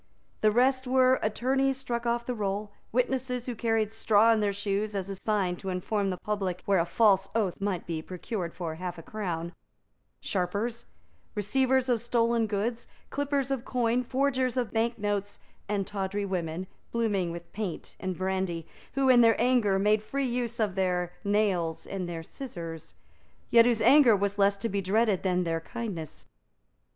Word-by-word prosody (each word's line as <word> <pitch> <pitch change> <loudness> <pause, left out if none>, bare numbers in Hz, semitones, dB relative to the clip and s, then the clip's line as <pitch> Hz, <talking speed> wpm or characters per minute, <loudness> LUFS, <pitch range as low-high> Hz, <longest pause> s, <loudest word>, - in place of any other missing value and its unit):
The 215 - +5
rest 260 +3 +2
were 260 0 +4
attorneys 265 +5 +1
struck 240 -2 -3
off 235 0 0
the 250 - -2
roll, 205 -1 -2 0.2
witnesses 250 0 0
who 250 - -3
carried 225 -2 0
straw 225 0 +4
in 220 - +1
their 205 -1 +1
shoes 200 +1 -2
as 195 -1 -3
a 195 - -3
sign 190 -3 0
to 195 - -6
inform 195 +2 -1
the 185 - -2
public 190 -4 -3
where 195 -2 +3
a 170 - +2
false 195 -3 +3
oath 200 -5 0
might 195 -3 -1
be 165 -2 -3
procured 180 +1 -5
for 170 -3 -4
half 180 +1 -5
a 165 - -9
crown, 170 -5 -4 0.7
sharpers, 205 - -2 0.5
receivers 260 +5 +2
of 240 -3 +1
stolen 235 -1 +1
goods, 220 +3 -2 0.2
clippers 280 -1 -1
of 265 -3 -1
coin, 245 -2 +1
forgers 260 0 0
of 245 -3 0
bank 230 +1 0
notes, 205 -1 -2 0.3
and 200 -2 0
tawdry 200 0 -2
women, 180 -2 -3 0.3
blooming 205 -6 0
with 170 0 -9
paint 200 -5 -5
and 185 -1 -3
brandy, 185 -3 -2 0.3
who, 275 -1 +2
in 250 -2 +7
their 230 -1 +5
anger, 235 -5 +3
made 210 +2 +3
free 275 +5 -2
use 240 -1 -2
of 210 -4 +1
their 180 -2 0
nails 200 -6 +1
and 185 -3 -4
their 165 -1 -5
scissors, 165 - -8 0.6
yet 230 -1 +7
whose 235 -3 +2
anger 255 -1 +7
was 200 +1 -1
less 200 0 +4
to 200 - -2
be 200 -2 -1
dreaded 205 +1 +2
than 180 -1 +1
their 165 -1 -1
kindness. 170 -5 -6
210 Hz, 170 wpm, -28 LUFS, 190-235 Hz, 0.7 s, in